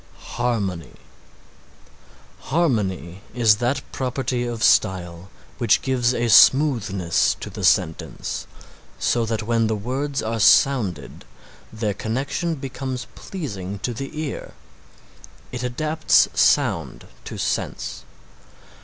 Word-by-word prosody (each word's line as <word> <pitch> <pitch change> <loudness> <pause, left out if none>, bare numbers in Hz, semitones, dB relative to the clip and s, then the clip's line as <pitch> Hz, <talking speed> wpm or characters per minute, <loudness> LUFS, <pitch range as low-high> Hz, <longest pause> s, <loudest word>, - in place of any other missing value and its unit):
HARMONY 100 - -2 1.5
Harmony 100 - 0
is 115 -4 +4
that 130 +4 -1
property 125 -1 -2
of 115 -2 -4
style 90 -1 +2 0.3
which 120 - +3
gives 125 -2 +1
a 120 - 0
smoothness 110 - +4
to - - -7
the - - -7
sentence, 80 - 0 0.5
so 115 -1 0
that 110 0 -2
when 115 0 +1
the 110 - 0
words 135 +6 -3
are 115 +1 -2
sounded 105 - +3 0.5
their 110 -2 -2
connection 135 - -2
becomes 130 -2 -5
pleasing 100 - -6
to 120 +5 -3
the 135 +6 -6
ear. 155 -3 -5 1.0
It 125 - -5
adapts 155 +6 +2
sound - - +1 0.2
to - - -7
sense. - - -3
120 Hz, 105 wpm, -22 LUFS, 100-135 Hz, 1.5 s, is